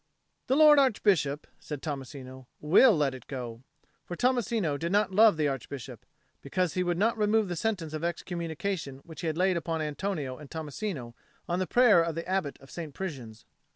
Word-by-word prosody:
"The 265 - +2
Lord 300 -1 +7
Archbishop," 195 - +2
said 150 -3 -7
Tommasino, 130 -3 -7
"will 185 +7 +5
let 140 -3 +1
it 130 -3 -11
go." 120 -4 -6 0.4
For 175 - -6
Tommasino 235 - +1
did 165 +4 -3
not 205 0 +2
love 210 -2 +5
the 150 -2 +2
Archbishop, 135 -2 -6 0.3
because 180 +3 -1
he 185 - 0
would 175 -1 0
not 225 +4 +1
remove 210 -1 +2
the 175 - -2
sentence 170 -4 -2
of 155 +1 -4
excommunication 170 -3 -4
which 160 -2 -10
he 170 - -2
had 160 0 -2
laid 185 0 +2
upon 165 -1 -2
Antonio 150 -3 -3
and 150 -2 -11
Tommasino 155 - -5 0.3
on 175 +1 -1
the 185 - -1
prayer 240 -8 +5
of 165 -1 -2
the 165 0 -5
Abbot 185 -6 -1
of 135 - -15
St. 160 -5 -7
Prisian's. 130 - -7
165 Hz, 185 wpm, -28 LUFS, 145-195 Hz, 0.4 s, Lord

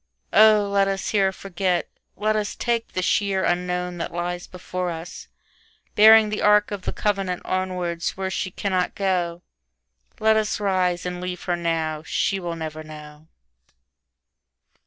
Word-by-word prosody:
Oh, 215 -1 +6
let 200 0 +2
us 195 0 -2
here 195 -2 +3
forget, 185 -2 -2 0.3
let 215 +2 0
us 210 -1 -2
take 235 -1 -2
the 185 - -1
sheerUnknown 180 -2 0
that 165 - -3
lies 175 +1 -4
before 180 0 -4
us, 165 0 -7 0.7
bearing 220 0 +7
the 210 - -3
arkOf 210 -1 +3
the - - -3
covenant 195 -3 -1
onwards 180 -3 -2
where 190 0 -3
she 190 - -2
cannot 185 -1 -1
go. 180 -3 -1 0.8
Let 220 0 +4
us 215 -1 0
rise 185 -3 0
and 180 0 -4
leave 180 0 -5
her 175 - 0
now, 165 -2 -2
she 195 +4 -1
will 170 -2 -4
never 155 -1 -6
know. 150 0 -12
185 Hz, 140 wpm, -23 LUFS, 175-200 Hz, 0.8 s, bearing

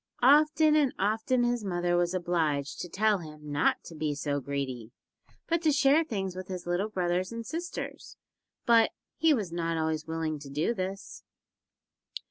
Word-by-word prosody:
Often 305 +3 +5
and 285 -4 +2
often 220 +5 +1
his 240 -2 0
mother 175 -2 0
was 175 +1 +1
obliged 160 -5 -1
to 175 - -5
tell 210 +3 +2
him 150 -2 -10
not 145 - +1
to - - -10
be 155 -2 -2
so 145 0 -1
greedy, 130 -4 -4 0.6
but 335 0 0
to 315 -3 +3
share 280 +3 +4
things 195 - -4
with 185 0 -6
his 180 -2 -6
little 175 +5 -1
brothers 180 -1 -1
and 230 0 -6
sisters, 335 +8 -6 0.5
but 230 -1 +5 0.3
he 325 0 +4
was 210 - 0
not 165 -1 -1
always 160 -1 -1
willing 160 -2 -2
to 140 -1 -10
do 150 +11 0
this. 195 -1 -6
180 Hz, 165 wpm, -29 LUFS, 160-235 Hz, 0.6 s, Often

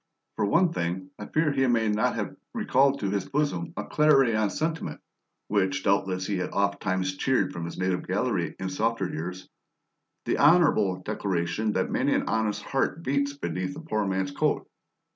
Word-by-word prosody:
For 105 - 0
one 170 - +3
thing, 90 - -3
I 105 - -6
fear 155 -1 +1
he 135 -2 +2
may 115 -2 +2
not 105 0 +1
have - - -3 0.2
recalled 135 +1 +2
to 100 -2 -1
his 100 -2 -2
bosom 140 - -1
a - - -2
clarion 135 -9 +3
sentiment 160 - -3 0.5
(which 95 -2 0
doubtless 95 -2 +1
he 100 -1 -1
had 90 - -2
ofttimes 95 -2 0
cheered 130 -2 +1
from 85 -2 -4
his 85 - -7
native 95 -1 -1
gallery - - -1
in 95 - -3
softer 110 +1 0
years): 90 +3 -6 0.8
the - - 0
honourable 145 - +5
declaration 95 +4 -1
that - - 0
many - - +2
an - - 0
honest 105 -2 0
heart 140 +4 -1
beats 140 0 0
beneath 90 - -3
a - - -7
poor 110 -11 -1
man's 95 0 -1
coat. - - 0
105 Hz, 170 wpm, -27 LUFS, 95-135 Hz, 0.8 s, honourable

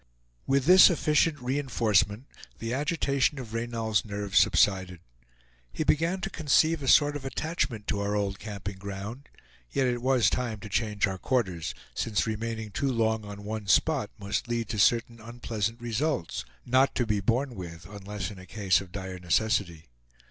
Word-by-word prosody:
With 135 -1 +2
this 185 +3 +9
efficient 155 -2 +2
re 130 +3 -1
enforcement 110 -4 +1 0.3
the 115 +1 -4
agitation 140 -1 0
of 120 -4 -7
Reynal's 115 -2 -1
nerves 100 -2 0
subsided. 95 -3 +2 0.7
He - - -2
began 165 +5 +1
to 195 - -3
conceive 155 0 +2
a 135 - -5
sort 145 +2 +5
of 145 - -5
attachment 135 -5 -2
to 100 - 0
our 100 0 -1
old 100 -1 -1
camping 100 -2 -6
ground; 100 +7 -7 0.4
yet 135 - 0
it 120 -1 0
was 130 -2 +3
time 120 -4 -2
to 105 - -8
change 105 0 0
our 95 -2 -4
quarters, 95 -9 -1 0.2
since 110 -3 0
remaining 110 0 -4
too 135 +8 -1
long 110 -2 0
on 100 0 -8
one 105 -1 -5
spot 130 - +2
must 100 +3 -3
lead 120 -2 -2
to 110 -2 -3
certain 115 +2 +2
unpleasant 115 -1 -4
results 120 - -2 0.2
not 130 +2 +3
to 120 - +1
be 105 -2 0
borne 120 +6 0
with 85 -4 -8
unless 100 0 -6
in 100 - -11
a 95 - -12
case 95 -4 +1
of 95 -2 -12
dire 95 -1 -6
necessity. 90 -2 0
110 Hz, 170 wpm, -28 LUFS, 100-130 Hz, 0.7 s, this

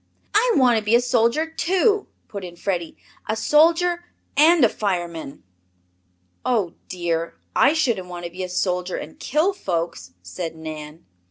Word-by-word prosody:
"I 460 +3 +4
want 245 -4 +5
to - - -8
be 215 +3 +3
a - - +6
soldier, 245 +4 +2
too," 380 +6 +1 0.2
put 200 -2 -7
in 175 -1 -8
Freddie. 175 -2 -3 0.3
"A 215 - +1
soldier 335 +7 +3 0.3
and 310 0 +6
a - - +6
fireman." 175 -8 -3 1.0
"Oh, 210 -9 0 0.2
dear, 170 -2 -2 0.2
I 275 +3 +5
shouldn't 235 - 0
want 175 -1 -7
to 170 - -6
be 185 +2 -7
a 180 - -4
soldier 180 0 -1
and 155 - -8
kill 315 +8 +1
folks," 165 - -3
said 165 - -5
Nan. 155 0 -8
200 Hz, 155 wpm, -23 LUFS, -, 1.0 s, a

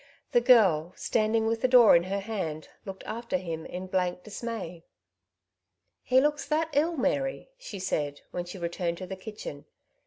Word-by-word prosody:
The 240 - +4
girl, 190 -10 +5
standing 220 0 +1
with 225 0 0
the 255 - +3
door 245 -5 +8
in 170 +1 +3
her 195 +1 -2
hand, 185 -8 -4 0.2
looked 195 -1 -7
after 230 -3 -3
him 165 -3 -5
in 180 +1 -6
blank 180 -1 -1
dismay. 210 -6 -6 0.6
" - - -58 0.3
He 255 +1 +4
looks 295 +1 0
that 315 +2 +1
ill, 325 +3 +2
Mary/' 270 - -1
she 225 - -8
said, 150 -6 -2
when 175 0 -4
she 175 +2 -8
returned 170 0 -2
to 185 - -6
the 190 +1 -6
kitchen. 190 -7 -8
195 Hz, 175 wpm, -28 LUFS, 175-235 Hz, 0.6 s, door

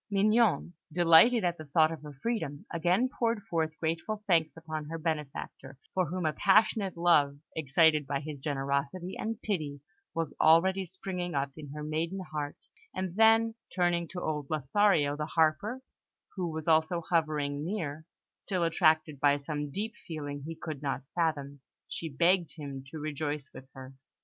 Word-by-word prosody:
Mignon, 210 -2 +3 0.2
delighted 175 +8 +6
at 175 -2 0
the 155 - -7
thought 155 +2 +3
of 160 - -6
her 150 -2 -10
freedom, 215 -12 -2
again 175 +9 +2
poured 230 -4 -1
forth 160 -4 -2
grateful 170 +7 -2
thanks 165 -5 +2
upon 155 -1 -5
her 165 +2 -5
benefactor, 150 -4 -4 0.2
for 185 -2 +1
whom 180 +2 -3
a 155 - +1
passionate 200 -2 +3
love, 150 -5 +4 0.2
excited 155 0 +3
by 140 0 -1
his 150 0 -7
generosity 140 +5 -2
and 225 0 -3
pity, 155 -9 -2 0.4
was 165 -2 -2
already 185 +4 +5
springing 180 -1 -5
up 140 0 0
in 150 -2 -9
her 150 0 -6
maiden 160 +5 -2
heart, 145 -1 -4 0.4
and 185 -2 -3
then, 225 +1 +5 0.2
turning 175 -2 +1
to 180 - -6
old 150 -4 -3
Lothario 155 0 +2
the 150 0 -3
Harper, 175 +12 +1 0.5
who 180 -3 -2
was 160 0 -5
also 160 +2 +3
hovering 150 -4 0
near, 160 -5 -3 0.4
still 185 -4 0
attracted 155 -3 +2
by 145 0 +4
some 145 0 -4
deep 210 +9 -4
feeling 145 -3 -5
he 165 - -5
could 155 -3 -6
not 135 -3 -2
fathom, 145 -4 -1 0.3
she 165 - -5
begged 170 +1 +2
him 140 -4 -7
to 160 - -7
rejoice 150 -1 -4
with 130 0 -12
her. 130 0 -10
160 Hz, 160 wpm, -30 LUFS, 145-180 Hz, 0.5 s, delighted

